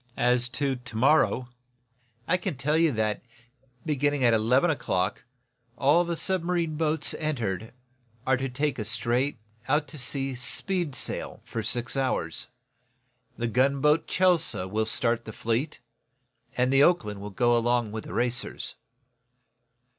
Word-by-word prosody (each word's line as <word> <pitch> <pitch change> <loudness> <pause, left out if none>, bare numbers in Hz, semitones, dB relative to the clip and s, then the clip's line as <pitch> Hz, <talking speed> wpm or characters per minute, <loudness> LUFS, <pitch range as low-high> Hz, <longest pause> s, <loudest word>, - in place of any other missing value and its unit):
As 125 0 +2
to 135 0 -1
to 125 -2 -9
morrow, 130 -1 +3 0.8
I 180 - +3
can 180 -5 -3
tell 150 +3 0
you 165 -1 +4
that, 110 -1 -1 0.6
beginning 145 -2 +1
at 120 -1 +5
eleven 125 +9 +3
o'clock, 100 -9 -1 0.5
all 150 +6 +4
the 170 -1 -3
submarine 175 -4 -1
boats 160 0 0
entered 115 - -2 0.5
are 130 - +3
to 135 +2 -2
take 140 +1 -1
a - - -1
straight, 120 +5 0 0.3
out 150 +2 +2
to 150 - -8
sea 135 +1 -2
speed 145 +5 -2
sail - - -3
for 115 - -4
six 120 +3 -1
hours. 135 -1 -1 0.9
The 120 - -2
gunboat, 140 +6 +2
'Chelsea' 180 - +2
will 110 +3 -1
start 115 +1 0
the 110 - -6
fleet, 115 +8 -2 0.8
and 125 +1 +2
the 135 - +5
'Oakland' 105 - +2
will 105 - -6
go 120 +5 +2
along 120 -1 +1
with 110 0 -6
the - - -8
racers." 120 0 -1
130 Hz, 140 wpm, -27 LUFS, 115-150 Hz, 0.9 s, at